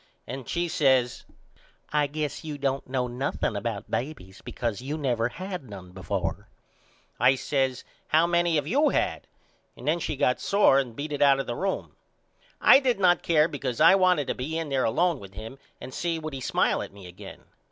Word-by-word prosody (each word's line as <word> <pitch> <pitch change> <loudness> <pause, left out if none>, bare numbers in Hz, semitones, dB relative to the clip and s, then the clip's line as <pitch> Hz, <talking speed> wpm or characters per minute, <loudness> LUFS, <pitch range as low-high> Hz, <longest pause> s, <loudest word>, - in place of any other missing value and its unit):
And 130 -1 -7
she 175 0 0
says 130 -6 +2 0.7
I 150 -1 +3
guess 150 +2 -4
you 150 -2 -5
don't 135 -1 -2
know 130 -1 0
nothing 125 -2 -2
about 100 0 -4
babys 115 -8 -5
because 115 -4 -3
you 145 +4 -4
never 120 -5 0
had 180 - -7
none 95 -3 -10
before. 95 -2 -4 0.7
I 130 - +5
says 130 -1 -1 0.2
How 160 +2 +4
many 170 -1 +2
have 145 -2 +1
you 280 - +3
had. - - -1 0.5
And - - -9
then 165 +3 +2
she 155 - -3
got 125 -2 +1
sore 200 -9 +4
and 125 -4 -4
beat 150 +3 -5
it 145 - -3
out 140 -1 +5
of 135 - -2
the 120 - -3
room. 195 +6 -2 0.7
I - - +7
did 250 -6 0
not 175 -2 +4
care 155 -2 +3
because 135 -5 -4
I 165 +4 +8
wanted 185 -6 +3
to - - -1
be 155 +6 -4
in 165 -2 -3
there 135 -2 +1
alone 170 +6 +1
with 95 -1 -12
him 110 +6 -9 0.2
and 130 - -9
see 170 -1 -1
would 155 -2 -6
he 135 - -5
smile - - +1
at - - -7
me 100 -1 -13
again. 90 0 -11
140 Hz, 195 wpm, -26 LUFS, 125-165 Hz, 0.7 s, I